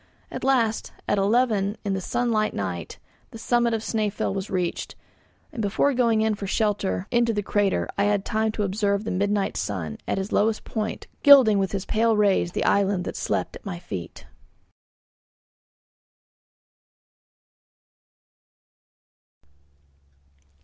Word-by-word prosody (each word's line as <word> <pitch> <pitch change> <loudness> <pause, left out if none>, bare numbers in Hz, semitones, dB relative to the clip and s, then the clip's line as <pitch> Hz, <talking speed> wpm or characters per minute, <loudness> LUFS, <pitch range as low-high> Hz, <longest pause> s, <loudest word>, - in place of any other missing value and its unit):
At - - -6
last, 235 -5 +1
at 205 - +1
eleven 210 -1 +1
in 200 - 0
the 190 - -2
sunlight 230 0 0
night, 90 -4 -4 0.3
the - - -10
summit 235 0 +1
of 220 - -3
Snæfell 215 -4 -1
was 195 0 -4
reached, 180 -2 -3 0.6
and 230 - -4
before 215 +7 +1
going 230 -3 +2
in 220 0 +2
for 200 -1 -5
shelter 195 - 0
into 235 -1 +2
the 205 - -1
crater 195 - 0
I 200 - +3
had 205 -1 +1
time 220 0 0
to 210 - -2
observe 200 +1 0
the 220 - -3
midnight 200 +1 0
sun, 85 -7 -4
at - - -1
his 190 +1 -3
lowest 215 +1 +1
point, 220 -1 -4 0.2
gilding 260 -8 +7
with 195 -1 -1
his 195 -1 -3
pale 225 0 +2
rays 195 -4 +2
the - - -1
island 195 -2 +2
that - - -5
slept - - -2
at - - -11
my 195 -4 -5
feet. 90 - -8
205 Hz, 135 wpm, -24 LUFS, 195-225 Hz, 0.6 s, gilding